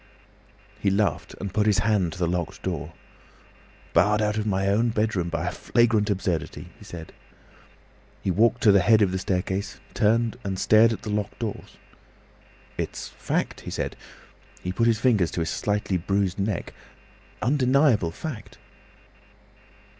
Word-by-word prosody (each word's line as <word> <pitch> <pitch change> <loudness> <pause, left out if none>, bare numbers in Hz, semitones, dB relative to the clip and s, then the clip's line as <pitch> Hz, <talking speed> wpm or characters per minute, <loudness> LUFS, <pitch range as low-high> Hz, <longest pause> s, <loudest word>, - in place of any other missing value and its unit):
He 100 - +1
laughed, 100 0 0
and 100 -1 -5
put 105 -1 +2
his 105 - +4
hand 100 -7 +2
to - - -10
the 90 - +1
locked 85 -1 -3
door. - - -4 1.0
"Barred 105 +5 +4
out 105 -1 +1
of 110 0 -2
my 95 -1 0
own 110 +4 +2
bedroom, 105 -6 0
by 85 +1 -2
a - - 0
flagrant 110 +1 +2
absurdity!" 95 -4 -2
he - - -13
said. 85 -2 -9 1.1
He 95 - +1
walked 115 +6 +3
to 105 - +7
the 100 - +6
head 110 +4 +5
of 95 - +1
the 95 - -1
staircase, 95 +2 -2
turned, 115 +1 +2
and 95 -1 -3
stared 110 +4 +5
at 115 - -5
the 105 - -4
locked 105 -1 -2
doors. 115 -4 -6 1.0
"It's - - -4
fact," - - -3
he - - -7
said. - - -3 0.7
He 90 - -2
put 115 +5 +1
his 115 -2 +3
fingers 110 -9 +3
to 85 - -1
his 80 - -1
slightly 105 -2 -1
bruised 95 +1 -1
neck. 100 -2 -2 0.7
"Undeniable 130 - +3
fact! 110 - -7
105 Hz, 155 wpm, -25 LUFS, 95-110 Hz, 1.1 s, to